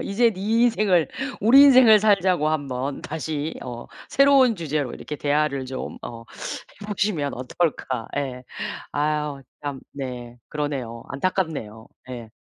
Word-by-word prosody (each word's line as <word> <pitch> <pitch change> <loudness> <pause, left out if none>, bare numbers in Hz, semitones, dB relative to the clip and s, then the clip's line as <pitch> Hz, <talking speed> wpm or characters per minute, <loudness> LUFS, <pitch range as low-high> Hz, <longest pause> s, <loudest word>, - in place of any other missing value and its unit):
"이제 230 +4 +2
네 190 -3 -8
인생을 215 -5 +3 0.3
우리 250 +6 +8
인생을 255 -6 +8
살자."고 190 -7 +3
한번 140 -3 -2
다시 155 0 -3
어 120 -1 -7 0.2
새로운 275 -5 +5
주제로 150 -5 -2
이렇게 150 - -7
대화를 145 -2 0
좀 130 0 -6
어 115 -1 -8 0.6
해 205 - -8
보시면 190 -9 -1
어떨까. 130 -2 -2
예 130 -3 -3 0.5
아유 150 -1 -1 0.2
참 140 -2 -4
네 125 -3 -7
그러네요. 135 -6 -4
안타깝네요. 140 - -2 0.2
예. 120 -3 -7
150 Hz, 265 characters per minute, -24 LUFS, 130-195 Hz, 0.6 s, 우리